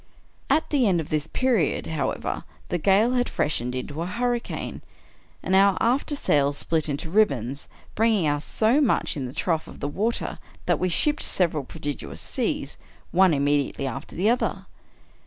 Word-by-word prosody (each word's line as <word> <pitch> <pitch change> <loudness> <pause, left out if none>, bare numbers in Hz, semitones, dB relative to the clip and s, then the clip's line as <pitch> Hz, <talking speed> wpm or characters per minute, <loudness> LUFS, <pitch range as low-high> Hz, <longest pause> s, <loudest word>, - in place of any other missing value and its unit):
At 305 +3 +2
the 270 -6 +3
end 180 -3 +3
of 160 - -5
this 155 0 -1
period, 235 - +1
however, 160 -2 -2 0.3
the 175 - -1
gale 200 +7 +4
had 245 -1 +1
freshened 125 -4 -1
into 145 +5 -4
a 170 - -2
hurricane, 240 +4 -2 0.6
and 190 - +1
our 195 0 +5
after 260 +5 +1
sail 145 - +2
split 155 +2 0
into 145 +3 -3
ribbons, 140 - +1 0.3
bring 225 +1 +3
ing 175 -7 +1
us 145 0 0
so 230 +7 +2
much 270 - +1
in 135 -4 -3
the - - -7
trough 160 +3 -1
of - - -11
the - - -2
water 215 +10 -2 0.3
that - - +1
we 185 - +1
shipped 295 - +2
several 160 -5 +2
prodigious 145 0 -6
seas, - - -2 0.3
one 185 0 +5
immediately 145 -1 +1
after 135 +3 -6
the 190 +5 +1
other. 240 +2 0
175 Hz, 170 wpm, -25 LUFS, 145-225 Hz, 0.6 s, our